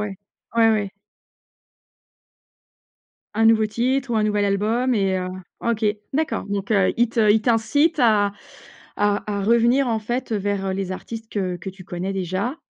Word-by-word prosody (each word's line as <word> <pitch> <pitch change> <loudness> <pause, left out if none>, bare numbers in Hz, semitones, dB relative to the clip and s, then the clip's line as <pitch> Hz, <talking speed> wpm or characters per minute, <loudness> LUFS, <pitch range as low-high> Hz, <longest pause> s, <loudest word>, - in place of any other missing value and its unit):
ouais. 210 -2 -4 0.4
Ouais, 225 -1 +5
ouais. 205 -3 0 2.4
Un 225 +1 +3
nouveau 220 -1 +5
titre 255 +4 -1
ou 230 - +1
un 215 - +2
nouvel 210 -1 +1
album 215 +6 +1
et 195 -4 +1
heu, 185 0 -3 0.3
OK, 235 -1 -1 0.3
d'accord, 310 -4 -1
donc 200 +1 -2
heu, 195 -3 +3
il 240 0 +3
te 220 -2 +2
il 220 - +4
t'incite 250 +8 +2
à 210 -4 +3 0.6
à 205 0 +1
à 200 -1 -2
revenir, 235 +4 +3
en 225 -2 0
fait, 240 +3 -3
vers, 200 -2 -1
heu, 190 - -1
les 190 -1 -3
artistes 225 +4 -8
que 185 -3 -2
que 175 +3 -7
tu 190 0 -14
connais 185 +1 -4
déjà 195 - -2
215 Hz, 165 wpm, -22 LUFS, 195-235 Hz, 2.4 s, Ouais